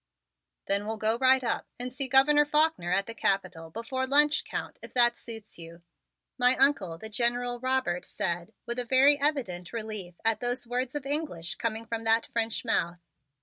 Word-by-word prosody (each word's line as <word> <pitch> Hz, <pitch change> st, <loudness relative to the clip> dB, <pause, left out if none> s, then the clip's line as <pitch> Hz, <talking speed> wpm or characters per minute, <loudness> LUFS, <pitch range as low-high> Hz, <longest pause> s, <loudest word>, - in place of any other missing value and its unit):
"Then 200 Hz, +1 st, -1 dB
we'll 220 Hz, 0 st, -3 dB
go 220 Hz, +2 st, 0 dB
right 260 Hz, 0 st, +4 dB
up 235 Hz, -, -2 dB
and 250 Hz, 0 st, -6 dB
see 270 Hz, 0 st, -2 dB
Governor 270 Hz, +3 st, +5 dB
Faulkner 300 Hz, -, +1 dB
at 195 Hz, +2 st, +1 dB
the 230 Hz, -, -6 dB
Capitol 185 Hz, -6 st, -2 dB
before 260 Hz, +7 st, -4 dB
lunch, 295 Hz, +2 st, +4 dB
Count, -, -, -6 dB
if -, -, -12 dB
that 240 Hz, -1 st, +5 dB
suits 225 Hz, -6 st, -8 dB
you," 170 Hz, +1 st, -12 dB, 0.6 s
my 250 Hz, +1 st, +5 dB
Uncle, 240 Hz, -, +3 dB
the 220 Hz, -, -9 dB
General 245 Hz, +2 st, 0 dB
Robert, 255 Hz, -9 st, -1 dB
said 175 Hz, +2 st, -3 dB
with 240 Hz, +1 st, -2 dB
a -, -, 0 dB
very 275 Hz, +4 st, +4 dB
evident 235 Hz, -, -1 dB
relief 215 Hz, -6 st, -6 dB
at 225 Hz, -1 st, +2 dB
those 245 Hz, +1 st, -1 dB
words 250 Hz, +2 st, -3 dB
of 290 Hz, -2 st, -4 dB
English 275 Hz, -, -2 dB
coming 225 Hz, 0 st, -3 dB
from 225 Hz, 0 st, -4 dB
that 225 Hz, 0 st, +3 dB
French 230 Hz, 0 st, -2 dB
mouth. 175 Hz, -6 st, 0 dB
235 Hz, 180 wpm, -28 LUFS, 200-260 Hz, 0.6 s, Governor